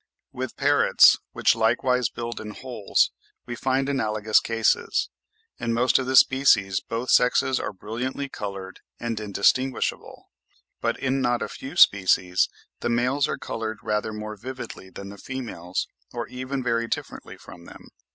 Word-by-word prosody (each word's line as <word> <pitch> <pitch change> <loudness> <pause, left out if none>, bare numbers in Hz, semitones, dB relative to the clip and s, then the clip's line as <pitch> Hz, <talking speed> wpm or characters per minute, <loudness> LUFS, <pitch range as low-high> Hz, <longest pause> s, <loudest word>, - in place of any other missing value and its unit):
With 130 -1 -6
parrots, 145 0 +5
which - - +3
likewise 120 +2 +1
build 120 0 -6
in 105 -1 -8
holes, 120 -6 0 0.3
we 120 - -5
find 130 +3 0
analogous 110 -5 +2
cases: 115 -1 0 0.5
in 115 -1 -1
most 125 +3 +3
of 130 - -3
the 130 - 0
species, 125 -9 +5
both 115 +2 -3
sexes 125 +1 +3
are - - -3
brilliantly 120 +8 -4
coloured 100 -6 -7 0.2
and 115 -2 -3
indistinguishable, 110 +6 -1 0.5
but - - 0
in 135 0 0
not 120 -1 +1
a - - -3
few 135 +5 -9
species 95 - +4 0.3
the - - -2
males 125 +4 +1
are - - -3
coloured 110 -1 -4
rather 105 +1 -1
more 105 0 -6
vividly 120 -3 -8
than 100 +1 -9
the 100 0 -11
females, 110 -9 -4 0.2
or 120 -1 -4
even 130 +1 -4
very 115 -1 0
differently - - -5
from 85 -1 -13
them. - - -13
120 Hz, 150 wpm, -25 LUFS, 105-130 Hz, 0.5 s, parrots